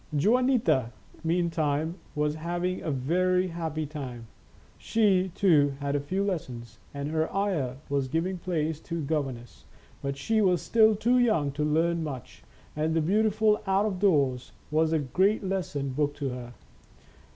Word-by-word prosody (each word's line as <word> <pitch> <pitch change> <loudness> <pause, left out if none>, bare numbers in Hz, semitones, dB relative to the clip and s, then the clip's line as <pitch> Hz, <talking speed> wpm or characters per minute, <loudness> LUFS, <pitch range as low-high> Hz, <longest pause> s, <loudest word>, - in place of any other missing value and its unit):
Juanita, 230 - +2 0.3
meantime, 165 -2 0 0.2
was 150 0 +1
having 175 +3 -2
a - - -3
very 180 +7 +1
happy 160 -2 -3
time. 130 -6 -7 0.5
She, 195 -4 +2
too, 145 -9 +4
had 140 0 -2
a - - +2
few 185 +8 -2
lessons, 125 - -4
and 140 0 -4
her 160 0 0
aya 185 -11 -1
was 140 -2 0
giving 175 +6 -1
place 160 -4 -2
to 170 +1 -5
a - - -2
governess, 135 -5 -4 0.4
but 140 0 -3
she 220 +10 +1
was 180 -4 +3
still 220 -1 +4
too 240 +4 +2
young 190 -13 +2
to 150 +2 -2
learn 165 +2 +1
much, 135 -6 -7 0.3
and 155 +1 0
the - - +3
beauti 210 +7 +2
ful 215 0 +2
out 195 +2 +3
of 195 -4 -2
doors 140 -10 +1 0.2
was 160 +1 +2
a 160 - +3
great 190 - +1
lesson 180 -8 -2
book 145 +2 -1
to 145 -2 -3
her. 125 -1 -7
160 Hz, 160 wpm, -27 LUFS, 140-190 Hz, 0.5 s, too